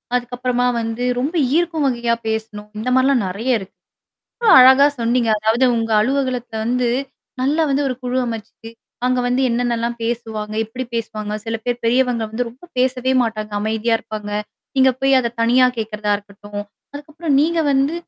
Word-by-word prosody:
அதுக்கப்பறமா 245 Hz, 0 st, -1 dB
வந்து, 225 Hz, +2 st, -3 dB, 0.2 s
ரொம்ப 290 Hz, +7 st, -2 dB, 0.2 s
ஈர்க்கும் 330 Hz, -3 st, +1 dB
வகையா 235 Hz, -2 st, 0 dB
பேசணும் 220 Hz, -1 st, -4 dB
இந்த 245 Hz, -, -2 dB
மாரிலாம் 260 Hz, -1 st, +3 dB
நெறையா 225 Hz, +8 st, -1 dB
இருக்கு 190 Hz, -, -12 dB, 0.7 s
ரொம்ப 460 Hz, -, +3 dB
அழகா 265 Hz, +2 st, +8 dB
சொன்னீங்க 235 Hz, 0 st, +1 dB
அதாவது 220 Hz, +4 st, +2 dB
உங்க 225 Hz, 0 st, -2 dB
அலுவலகத்த 255 Hz, -1 st, -1 dB
வந்து, 245 Hz, +1 st, +1 dB, 0.5 s
நல்லா 295 Hz, +5 st, +2 dB
வந்து 275 Hz, +1 st, +1 dB
ஒரு 255 Hz, -, -2 dB
குழு 250 Hz, +1 st, -1 dB
அமச்சு 225 Hz, 0 st, -7 dB, 0.4 s
அங்க 255 Hz, 0 st, +1 dB
வந்து 250 Hz, +1 st, +1 dB
என்னான்னலாம் 235 Hz, 0 st, -1 dB
பேசுவாங்க? 225 Hz, -2 st, -3 dB
எப்டி 250 Hz, +4 st, -6 dB
பேசுவாங்க? 215 Hz, -2 st, -4 dB
சில 225 Hz, 0 st, -2 dB
பேர் 245 Hz, -1 st, -2 dB
பெரியவங்க 245 Hz, 0 st, +2 dB
வந்து 240 Hz, +3 st, -2 dB
ரொம்ப 255 Hz, +8 st, -18 dB
பேசவே 255 Hz, 0 st, +1 dB
மாட்டாங்க, 215 Hz, -2 st, -3 dB
அமைதியா 220 Hz, +2 st, 0 dB
இருப்பாங்க. 210 Hz, -1 st, -7 dB, 0.5 s
நீங்க 265 Hz, 0 st, +5 dB
போய் 270 Hz, -1 st, +4 dB
அத 235 Hz, -1 st, -3 dB
தனியா 250 Hz, +2 st, +5 dB
கேட்கறதா 215 Hz, -1 st, -2 dB
இருக்கட்டும், 205 Hz, 0 st, -9 dB, 0.3 s
அதுக்கப்றம் 295 Hz, 0 st, -1 dB
நீங்க 335 Hz, +2 st, 0 dB
வந்து, 275 Hz, +4 st, +2 dB
240 Hz, 155 wpm, -19 LUFS, 225-260 Hz, 0.7 s, அழகா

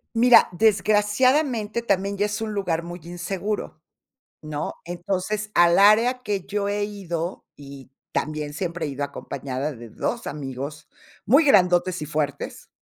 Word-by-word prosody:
Mira, 240 Hz, +1 st, +7 dB
desgraciadamente 220 Hz, -, +2 dB
también 200 Hz, -2 st, 0 dB
ya 205 Hz, +1 st, +1 dB
es 210 Hz, +1 st, -4 dB
un 220 Hz, -1 st, -3 dB
lugar 180 Hz, -5 st, -1 dB
muy 175 Hz, +1 st, -8 dB
inseguro, 180 Hz, +1 st, -4 dB, 0.6 s
¿no?, 155 Hz, -1 st, -4 dB
entonces, 190 Hz, +4 st, -3 dB
al 175 Hz, 0 st, +5 dB
área 225 Hz, +5 st, +5 dB
que 205 Hz, -5 st, -2 dB
yo 205 Hz, 0 st, -2 dB
he 205 Hz, 0 st, 0 dB
ido, 180 Hz, -4 st, -5 dB
y 140 Hz, -2 st, -12 dB, 0.2 s
también 150 Hz, -1 st, -2 dB
siempre 170 Hz, +1 st, -3 dB
he -, -, -3 dB
ido 140 Hz, 0 st, -3 dB
acompañada 140 Hz, 0 st, -5 dB
de 120 Hz, -3 st, -11 dB
2 230 Hz, -, -3 dB
amigos 140 Hz, +1 st, -6 dB, 0.4 s
muy 280 Hz, +8 st, +5 dB
grandotes 180 Hz, -, +3 dB
y -, -, -4 dB
fuertes. 150 Hz, -2 st, -3 dB
185 Hz, 140 wpm, -24 LUFS, 155-210 Hz, 0.6 s, Mira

